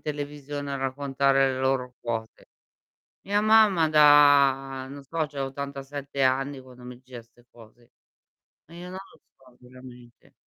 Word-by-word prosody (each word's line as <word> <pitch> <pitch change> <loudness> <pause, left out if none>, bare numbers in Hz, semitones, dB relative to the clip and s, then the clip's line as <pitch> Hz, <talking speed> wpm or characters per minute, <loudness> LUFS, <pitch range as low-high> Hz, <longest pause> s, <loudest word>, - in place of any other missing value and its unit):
televisione 145 -1 -6
a - - -2
raccontare 135 0 0
le 130 - -5
loro 130 -1 -1
cose?" 115 -1 -6 0.8
Mia 205 +1 0
mamma 215 -6 +4
da 140 -3 +4
non 140 +1 -10
so, 160 +3 -3
c'ha 140 -1 -6
87 140 0 -6
anni 135 +1 0
quando 125 -1 -16
mi 125 0 -10
diceva 125 -1 -12
'ste 120 +1 -27
cose. 115 +1 -19 0.7
Ma 165 - -18
io 175 +1 -9
non 185 - -8
lo - - -22 0.2
so, 130 -2 -22
veramente. 125 -1 -16
135 Hz, 145 wpm, -25 LUFS, 130-145 Hz, 0.8 s, mamma